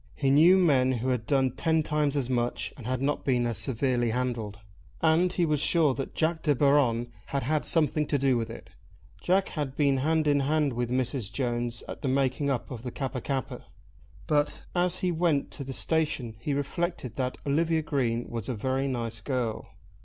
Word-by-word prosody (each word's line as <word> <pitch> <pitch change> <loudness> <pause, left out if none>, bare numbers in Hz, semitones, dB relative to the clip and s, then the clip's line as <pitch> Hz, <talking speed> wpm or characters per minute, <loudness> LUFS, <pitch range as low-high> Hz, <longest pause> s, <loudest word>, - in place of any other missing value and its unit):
He 135 -2 +1
knew 165 +7 +7
men 135 -8 +3
who 125 +1 -2
had 125 -3 -1
done 135 -2 +2
ten 160 +4 +1
times 150 -1 0
as 135 -4 0
much 120 -1 -1
and 125 -4 -9
had 130 +1 -1
not 145 +1 0
been 125 -3 +1
as 115 -4 0
severely 125 -2 +1
handled. 115 -3 -2 0.4
And 165 +3 +3
he 175 - +1
was 150 -2 +1
sure 155 -1 +2
that 135 0 -5
Jack 160 0 0
De 150 -3 +2
Baron 125 -4 +2 0.2
had 140 -1 -2
had 150 +4 0
something 150 -2 +2
to 145 - +1
do 135 -1 +2
with 115 -1 -2
it. 95 -4 -10 0.5
Jack 190 - +2
had 145 -5 -4
been 140 -2 +2
hand 155 +3 +1
in 145 -1 +3
hand 145 0 +1
with 120 0 -2
Mrs. 125 -3 -1
Jones 120 -2 -2
at - - -7
the 140 - -2
making 135 +1 +1
up 130 -1 -2
of 120 -4 -6
the 125 - -5
Kappa 130 0 -4
kappa. 130 -3 -4 0.6
But 150 -1 0
as 180 0 0
he 180 - +1
went 165 -4 +1
to 140 - -5
the 135 - -6
station 145 -6 -1
he 140 +4 -2
reflected 145 -3 -3
that 130 -1 -2
Olivia 160 +3 +1
Green 120 -5 -1
was 115 -2 -5
a 125 - -1
very 130 +5 -1
nice 115 -4 -3
girl. 120 -5 -3
135 Hz, 200 wpm, -28 LUFS, 125-150 Hz, 0.6 s, knew